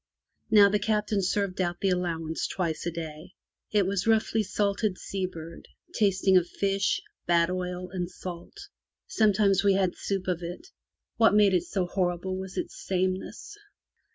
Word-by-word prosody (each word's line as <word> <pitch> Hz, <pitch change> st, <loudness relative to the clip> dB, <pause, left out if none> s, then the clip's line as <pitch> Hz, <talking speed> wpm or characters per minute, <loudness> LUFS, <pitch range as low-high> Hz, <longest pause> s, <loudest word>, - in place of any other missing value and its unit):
Now 210 Hz, -2 st, +8 dB
the 205 Hz, +1 st, +1 dB
Captain 210 Hz, 0 st, 0 dB
served 190 Hz, 0 st, -1 dB
out 175 Hz, -1 st, -1 dB
the 195 Hz, -, +1 dB
allowance 165 Hz, -3 st, -2 dB
twice 170 Hz, -2 st, -2 dB
a -, -, 0 dB
day. 165 Hz, +2 st, -7 dB, 0.4 s
It 205 Hz, -2 st, +2 dB
was 195 Hz, +2 st, -1 dB
roughly 220 Hz, 0 st, +3 dB
salted 200 Hz, -1 st, 0 dB
sea 190 Hz, -2 st, -3 dB
bird, 165 Hz, -1 st, -10 dB, 0.3 s
tasting 195 Hz, -2 st, +3 dB
of 175 Hz, -1 st, +1 dB
fish, 195 Hz, 0 st, 0 dB, 0.3 s
bad 170 Hz, 0 st, +3 dB
oil, 180 Hz, 0 st, -3 dB
and 180 Hz, -2 st, -3 dB
salt. 175 Hz, -2 st, -9 dB, 0.5 s
Sometimes 205 Hz, -3 st, +3 dB
we 200 Hz, -1 st, +5 dB
had 190 Hz, -2 st, +1 dB
soup 195 Hz, -2 st, -3 dB
of 180 Hz, -2 st, -1 dB
it. 175 Hz, -, -7 dB, 0.5 s
What 225 Hz, -2 st, +5 dB
made 205 Hz, -2 st, +5 dB
it 175 Hz, -1 st, +2 dB
so 185 Hz, +1 st, -1 dB
horrible 180 Hz, 0 st, -1 dB
was 190 Hz, 0 st, -7 dB
its -, -, -5 dB
sameness. 185 Hz, -, -2 dB
185 Hz, 155 wpm, -27 LUFS, 175-200 Hz, 0.5 s, Now